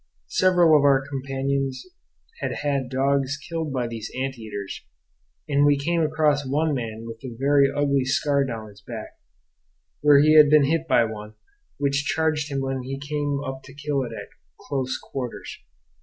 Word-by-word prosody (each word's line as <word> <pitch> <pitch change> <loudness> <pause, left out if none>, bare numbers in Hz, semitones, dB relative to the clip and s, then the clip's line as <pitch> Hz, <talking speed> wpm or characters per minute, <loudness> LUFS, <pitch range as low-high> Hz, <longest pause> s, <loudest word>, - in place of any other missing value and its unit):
Several 175 -4 +5
of 145 - +4
our 135 -1 +3
companions 135 -1 -2 0.5
had - - -3
had 140 -3 -1
dogs 135 +1 0
killed 160 0 -4
by 130 -2 -1
these 115 -2 -6
ant 135 0 -2
eaters; 105 -4 -7 0.7
and 145 -1 +2
we 145 0 +4
came 165 +4 0
across 150 -2 +2
one 150 +3 0
man 115 -4 -4
with 115 +2 -9
a 120 -3 -7
very 140 +1 +4
ugly 140 -1 +1
scar 140 +1 +1
down 115 -5 -5
his 100 -1 -17
back, - - -9 0.8
where 145 -1 +6
he 155 +2 +5
had 150 -1 +8
been 150 -1 +6
hit 165 +3 0
by 120 - +4
one, 110 -1 -8 0.4
which 140 +1 0
charged 155 -1 0
him 135 -1 -1
when 135 -1 -2
he 135 +2 -5
came 145 0 -2
up 135 0 -5
to 135 0 -14
kill 145 -1 -1
it 120 -3 -4
at 115 - -8 0.3
close 130 -2 -3
quarters. 125 -3 -7
140 Hz, 170 wpm, -24 LUFS, 130-145 Hz, 0.8 s, had